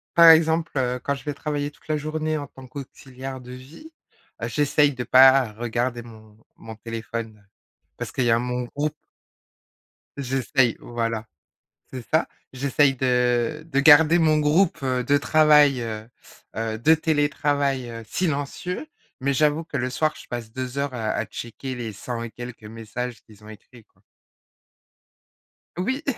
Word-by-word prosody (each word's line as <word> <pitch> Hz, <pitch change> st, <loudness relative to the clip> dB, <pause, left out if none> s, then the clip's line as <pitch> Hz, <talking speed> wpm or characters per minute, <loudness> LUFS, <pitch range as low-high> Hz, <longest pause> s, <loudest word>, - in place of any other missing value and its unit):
par 170 Hz, 0 st, +8 dB
exemple, 160 Hz, 0 st, +3 dB
heu, 125 Hz, -1 st, 0 dB
quand 140 Hz, -, -1 dB
je 135 Hz, -, -11 dB
vais 150 Hz, -, -3 dB
travailler 145 Hz, -1 st, -3 dB
toute -, -, -25 dB
la 155 Hz, -, 0 dB
journée 155 Hz, +1 st, -2 dB
en 145 Hz, -1 st, -5 dB
tant 130 Hz, -1 st, -14 dB
qu'auxiliaire 130 Hz, -1 st, -8 dB
de 125 Hz, 0 st, -11 dB
vie, 150 Hz, -, -13 dB, 0.5 s
heu, -, -, -2 dB
j'essaye 145 Hz, 0 st, +2 dB
de 125 Hz, -1 st, -5 dB
pas 130 Hz, -2 st, +6 dB
regarder 120 Hz, +2 st, -2 dB
mon 110 Hz, -2 st, -15 dB, 0.2 s
mon 110 Hz, 0 st, -10 dB
téléphone 110 Hz, -1 st, -7 dB, 0.5 s
parce -, -, -5 dB
qu'il 130 Hz, -, -1 dB
y 120 Hz, -, +2 dB
a 115 Hz, -, +4 dB
mon 125 Hz, +1 st, -2 dB
groupe. 150 Hz, +1 st, -2 dB, 1.2 s
J'essaye 135 Hz, -2 st, +1 dB
voilà. 115 Hz, -2 st, -3 dB, 0.7 s
C'est 125 Hz, -2 st, -7 dB
ça, 160 Hz, +1 st, +3 dB, 0.3 s
j'essaye 135 Hz, +1 st, +2 dB
de 125 Hz, 0 st, +1 dB
de 140 Hz, -4 st, +1 dB
garder 160 Hz, +3 st, +7 dB
mon 155 Hz, -2 st, +3 dB
groupe, 155 Hz, +5 st, +2 dB
heu, 130 Hz, -2 st, 0 dB
de 145 Hz, +3 st, +3 dB
travail, 150 Hz, -3 st, +5 dB
heu, 110 Hz, -1 st, -6 dB, 0.5 s
heu, 110 Hz, 0 st, -2 dB
de 155 Hz, +8 st, +5 dB
télétravail, 145 Hz, -4 st, 0 dB
heu, 115 Hz, 0 st, -7 dB
silencieux, 170 Hz, -, -3 dB, 0.3 s
mais 140 Hz, +1 st, 0 dB
j'avoue 150 Hz, +2 st, +2 dB
que 165 Hz, -, -6 dB
le 125 Hz, +1 st, -1 dB
soir, 155 Hz, +3 st, 0 dB
je -, -, -13 dB
passe 120 Hz, -2 st, -6 dB
2 130 Hz, +2 st, -5 dB
heures 140 Hz, -2 st, -2 dB
à 110 Hz, -3 st, -2 dB
à -, -, -1 dB
checker 130 Hz, +3 st, -7 dB
les 120 Hz, -3 st, -5 dB
cent 115 Hz, +4 st, -5 dB
et 115 Hz, -, -6 dB
quelques 120 Hz, 0 st, -9 dB
messages 115 Hz, +2 st, -6 dB
qu'ils 105 Hz, -1 st, -19 dB
ont 105 Hz, -, -12 dB
écrits, 110 Hz, +1 st, -15 dB
quoi. -, -, -36 dB, 1.7 s
Oui. 260 Hz, -, -2 dB
130 Hz, 160 wpm, -24 LUFS, 120-150 Hz, 1.7 s, par